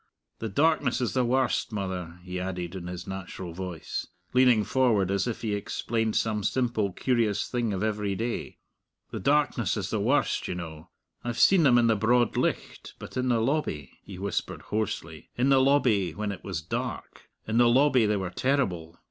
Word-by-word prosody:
The 110 - -3
darkness 145 +1 +2
is 125 - -1
the 130 - +2
warst, 130 0 +1
mother," 90 -4 -4
he 90 0 -5
added, 90 -1 -4
in 90 -2 -6
his 90 -1 -6
natural 95 -2 -6
voice, 90 -2 -5 0.3
leaning 125 -4 +5
forward 110 -7 +2
as 100 +4 0
if 120 - -4
he 110 -2 -1
explained 110 +2 -2
some 105 -2 0
simple, 115 -3 0
curious 110 -1 0
thing 120 -3 -1
of 95 0 -2
every 105 -2 -1
day. 115 +4 -4 0.5
"The - - -4
darkness 135 -5 +1
is 100 -3 -3
the 110 - 0
warst, 125 +8 +1
you - - -3
know. 80 -3 -8 0.3
I've 120 -1 -3
seen 190 -2 +6
them 130 -6 +5
in 120 - +4
the 115 -1 +4
broad 120 +2 +2
licht; - - -2
but - - -10
in 130 0 0
the 120 -2 +3
lobby," 115 - -1
he 95 - -10
whispered 100 0 -3
hoarsely 85 -7 -4
"in 125 +3 +2
the 135 -1 +5
lobby 115 - +3
when 105 -1 -2
it 95 - -8
was 90 -6 -4
dark - - -5 0.2
in 110 +2 +1
the 120 -1 +6
lobby 130 -2 +4
they 105 0 +1
were 95 -2 -3
terrible. 90 - -1
110 Hz, 185 wpm, -27 LUFS, 95-125 Hz, 0.5 s, seen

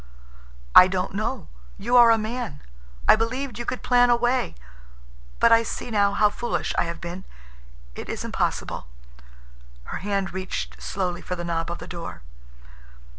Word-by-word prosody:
"I 185 - +10
don't 185 0 -2
know. 215 0 -3 0.3
You 240 +5 0
are 240 -1 +8
a 225 - +6
man. 215 - -4 0.4
I - - +8
believed 240 +2 -3
you 240 - -4
could 255 - -3
plan 245 0 +4
a 240 - +6
way, 245 +2 0 0.8
but 235 - +5
I 230 0 +7
see 230 +1 -5
now 200 -2 +3
how 210 +1 +4
foolish 240 +3 -2
I - - +2
have 170 0 -5
been. 175 +2 -7 0.7
It - - -8
is - - -4
impossible." 60 - -2 1.0
Her - - -6
hand 195 -1 -2
reached 65 - -5
slowly 175 - -3
for 180 - -4
the 175 - -5
knob 165 -1 -2
of 170 - -4
the - - -9
door. 170 - -7
200 Hz, 165 wpm, -24 LUFS, 175-240 Hz, 1.0 s, I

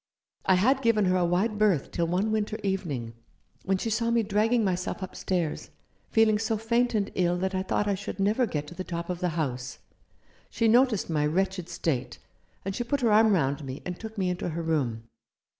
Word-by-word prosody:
"I 190 - +6
had 260 +9 +3
given 230 -4 +3
her 185 0 +2
a 180 - +2
wide 200 +5 0
berth 200 -9 +2
till 170 -1 0
one 190 +6 0
winter 215 0 -1
evening, 155 - -2 0.5
when 190 0 +2
she 225 +4 -3
saw 230 +2 +1
me 235 -1 +2
dragging 220 +3 +2
myself 185 0 -2
up 185 - -7
stairs, 175 -5 -2 0.4
feeling 220 -1 +4
so 220 0 0
faint 235 +2 +1
and 205 -1 0
ill 175 -1 +1
that 190 +2 -1
I 185 - 0
thought 205 +2 -1
I 200 - +2
should 195 +1 -6
never 215 +5 +2
get 150 -6 -3
to - - -10
the 185 - -5
top 170 0 -4
of 175 - -4
the 180 -1 0
house. 130 -4 -3 0.7
She 230 - +1
noticed 240 -2 +4
my 150 -2 +1
wretched 185 +2 -1
state, 125 -6 -2 0.5
and 195 0 -3
she 240 - -1
put 275 +3 -1
her 230 -3 +3
arm 215 0 +5
round 145 -4 0
me 135 +1 -7
and 180 -1 -5
took 220 0 -8
me 185 -2 +1
into 180 0 -3
her 165 +1 -3
room. 135 -9 -1
190 Hz, 210 wpm, -27 LUFS, 170-220 Hz, 0.7 s, I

